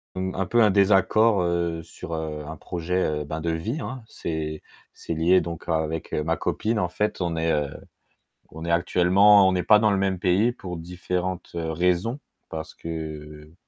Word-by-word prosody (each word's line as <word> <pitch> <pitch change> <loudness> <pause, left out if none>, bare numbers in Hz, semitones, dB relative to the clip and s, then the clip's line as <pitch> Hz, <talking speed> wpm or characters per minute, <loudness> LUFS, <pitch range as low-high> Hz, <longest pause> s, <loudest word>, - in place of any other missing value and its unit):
un 95 0 -2
peu 120 +4 +3
un 105 - +5
désaccord, 100 +1 +4
heu, 85 -1 -1
sur, 85 0 -9
heu, 75 -1 -4
un 80 -1 -7
projet, 90 +3 -2 0.2
heu, - - -3
ben, 80 +2 -5
de 85 +1 -1
vie, 105 - -3
hein. 130 -2 -6
C'est 80 -5 -5 0.3
c'est 85 - -5
lié 85 +4 +4
donc 85 -1 -6
avec 80 0 -2
ma 80 +2 0
copine 110 0 -1
en 90 -3 0
fait, 105 +1 -2
on 85 -2 -1
est, 80 0 +1
heu, 75 -2 0 0.8
on 80 +2 -8
est 85 - -1
actuellement 95 +4 +5
on 95 - +2
n'est 90 - 0
pas 105 -1 +6
dans 105 -1 +3
le 100 - +2
même 95 -2 0
pays 100 +6 +3
pour 95 -7 -7
différentes 90 +1 -4
raisons 90 - 0 0.3
parce 80 -1 -7
que 75 -1 -7
85 Hz, 180 wpm, -25 LUFS, 80-95 Hz, 0.8 s, pas